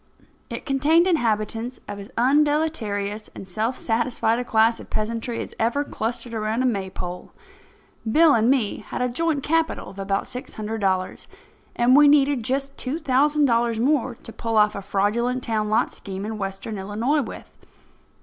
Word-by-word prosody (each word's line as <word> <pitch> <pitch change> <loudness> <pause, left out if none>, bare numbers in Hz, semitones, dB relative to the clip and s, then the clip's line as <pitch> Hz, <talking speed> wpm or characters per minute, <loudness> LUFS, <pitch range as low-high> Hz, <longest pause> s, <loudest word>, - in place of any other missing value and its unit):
It - - -6
contained 300 +5 +3
inhabitants 230 - 0
of 205 - -6
as 200 - -9
undeleterious 250 -7 +1
and 190 - -9
self 220 +7 -1
satisfied 235 0 0
a - - -1
class 225 -1 +3
of - - -11
peasantry 230 +2 -3
as - - -7
ever 235 +6 +1
clustered 235 -2 -4
around 220 +2 -1
a - - +1
Maypole. 190 -5 -3 0.8
Bill 315 +3 +6
and 230 +1 +3
me 255 -6 +2
had - - -4
a - - +2
joint 295 +3 -1
capital 325 +1 0
of 195 - -12
about 195 0 -1
six 250 - -6
hundred 220 +1 -4
dollars, 185 -1 -1 0.5
and 245 +2 +4
we 295 0 +8
needed 285 -2 +4
just 275 +4 -2
two 270 +4 -2
thousand 295 0 +2
dollars 235 -2 +1
more 260 -1 +1
to 225 - -12
pull 225 -1 -2
off 210 0 +5
a 200 - -5
fraudulent 220 +6 0
town 215 -2 -1
lot 215 - +2
scheme 195 0 -7
in 215 0 -5
Western 195 +2 -4
Illinois 225 +10 0
with. 255 - -8
230 Hz, 170 wpm, -23 LUFS, 215-275 Hz, 0.8 s, we